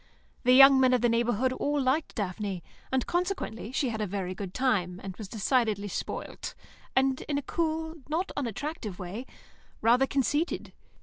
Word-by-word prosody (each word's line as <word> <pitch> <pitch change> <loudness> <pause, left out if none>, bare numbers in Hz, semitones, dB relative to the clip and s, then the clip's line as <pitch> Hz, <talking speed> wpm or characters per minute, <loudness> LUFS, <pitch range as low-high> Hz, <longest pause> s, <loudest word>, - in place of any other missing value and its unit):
The 250 - +6
young 270 +1 +9
men 255 -1 +5
of 245 - 0
the 240 - +4
neighbourhood 240 +2 +1
all 290 +2 0
liked 275 +4 0
Daphne, 195 -3 -3 0.3
and 260 -1 +1
consequently 350 - -2
she 260 0 0
had 220 -2 -3
a 210 - 0
very 185 -1 -3
good 190 -1 -6
time, 190 -7 0
and 190 -2 -6
was 215 - -7
decidedly 215 -1 +1
spoilt, - - -5 0.4
and, 265 0 +2
in 285 - +1
a 285 - -2
cool, 320 0 -1 0.2
not 345 +6 -1
unattractive 245 - -4
way, 200 +8 -6 0.5
rather 245 +4 +4
conceited. 290 +5 0
250 Hz, 165 wpm, -29 LUFS, 205-280 Hz, 0.5 s, young